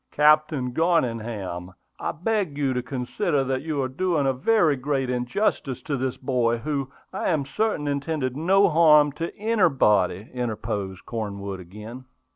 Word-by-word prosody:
"Captain 150 -3 +3
Garningham, 115 - -1 0.3
I - - -2
beg 185 -4 -1
you 140 -3 +1
to 125 - -1
consider 125 +2 -1
that 130 0 -1
you 155 -1 -3
are - - 0
doing 155 +2 0
a 135 - +2
very 160 - +3
great 135 -1 -1
injustice 125 - -1
to 145 - -2
this 130 -1 -2
boy, 125 -3 +1
who, 140 +1 -3 0.2
I 190 - -1
am 155 -5 +1
certain, 205 -1 -1
intended 140 -2 -2
no 190 +6 +4
harm 150 -3 +5
to 165 +4 -4
anybody," 135 - +2
interposed 105 -6 -4
Cornwood 100 -4 -5
again. 105 +8 -10
135 Hz, 145 wpm, -24 LUFS, 120-155 Hz, 0.3 s, harm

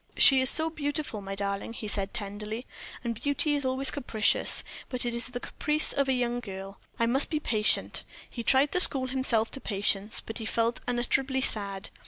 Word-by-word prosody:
"She 265 -1 +7
is 260 - +8
so 320 0 +6
beautiful, 290 -7 -4
my 195 0 -7
darling," 200 +2 -4
he 220 - -7
said, 200 -1 -2
tenderly, 210 +3 -6 0.4
"and 230 -2 -5
beauty 290 +1 0
is 285 -1 -2
always 260 +1 +3
capricious; 230 -6 0 0.3
it 250 -1 -2
is 235 0 -3
but 250 - -14
the 245 - -4
caprice 300 +1 +1
of 280 -1 0
a - - +2
young 245 -1 -2
girl. 195 -3 -9 0.2
I 230 - +1
must 260 +5 +3
be 305 - -2
patient." 215 -7 0 0.3
He 235 - -8
tried 265 +4 +2
to 360 - 0
school 270 -7 +6
himself 250 -4 +2
to 270 - -4
patience, 200 0 0
but 225 - -8
he 220 - -6
felt 230 +1 -1
unutterably 260 +2 -1
sad. 200 -5 0
240 Hz, 195 wpm, -27 LUFS, 215-270 Hz, 0.4 s, is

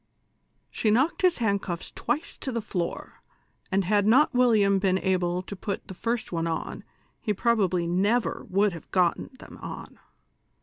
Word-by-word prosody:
She 220 - 0
knocked 265 +10 +2
his 365 -2 +3
handcuffs 200 -6 -2
twice 310 - -2
to 265 - -3
the 235 - -1
floor, 180 -5 -4 0.5
and 190 0 +1
had 205 +1 +2
not 265 +7 +5
William 215 -6 +4
been 190 -1 +2
able 180 -1 0
to 200 - -7
put 200 +1 -5
the - - -7
first 230 +5 -3
one 165 -1 -1
on, 165 -1 -4 0.4
he 210 -3 -1
probably 195 -6 +1
never 200 +8 +1
would 200 +1 +2
have 165 - -10
gotten 180 -2 +1
them - - -13
on. - - -8
200 Hz, 160 wpm, -26 LUFS, 185-230 Hz, 0.5 s, not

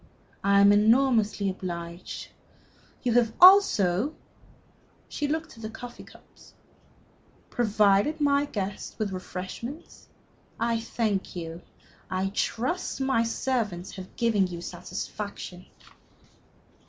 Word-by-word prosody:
I 200 0 +5
am 200 0 +7
enormously 220 -1 +3
obliged. 170 -2 -5 0.7
You 245 -2 +1
have 230 -2 +3
also" 295 - +6 0.9
she 295 - -3
looked 315 0 -3
at 225 - -13
the 220 - -5
coffee 240 +2 -9
cups - - -19 1.0
"provided 215 +5 +3
my 285 -1 +3
guests 200 -7 -5
with 215 -3 -2
refreshment. 190 - -7 0.5
I 230 0 +1
thank 220 -5 -2
you. 165 -1 -6 0.5
I 190 +1 -1
trust 250 - -2
my 265 -3 +2
servants 230 -6 -2
have 185 -1 -10
given 220 -5 +2
you 175 -1 -7
satisfaction. 185 +1 -7
215 Hz, 105 wpm, -27 LUFS, 190-245 Hz, 1.0 s, am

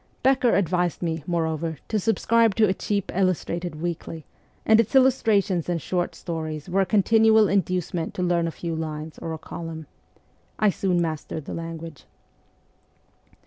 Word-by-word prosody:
Becker 260 -2 +4
advised 180 -2 0
me, 160 -2 -2
moreover, 160 -2 -1
to 215 - +1
subscribe 225 +1 +2
to 220 -1 +4
a 190 - +2
cheap 200 0 -2
illustrated 175 -2 -1
weekly, 165 -1 -5 0.4
and 220 0 +6
its 230 +3 +1
illustrations 215 - +3
and 175 -1 0
short 175 +3 -2
stories 155 -2 -5
were 190 +2 +1
a 190 - 0
continual 220 +1 +4
inducement 180 -3 -1
to 180 - -2
read 175 -1 +1
a - - -2
few 170 +1 -5
lines 155 -1 -5
or 165 - -5
a 160 - -4
column. 160 0 -7 0.7
I 215 -2 +3
soon 185 -2 0
mastered 155 -1 -4
the - - -6
language. 165 -2 -7
175 Hz, 150 wpm, -24 LUFS, 165-200 Hz, 0.7 s, and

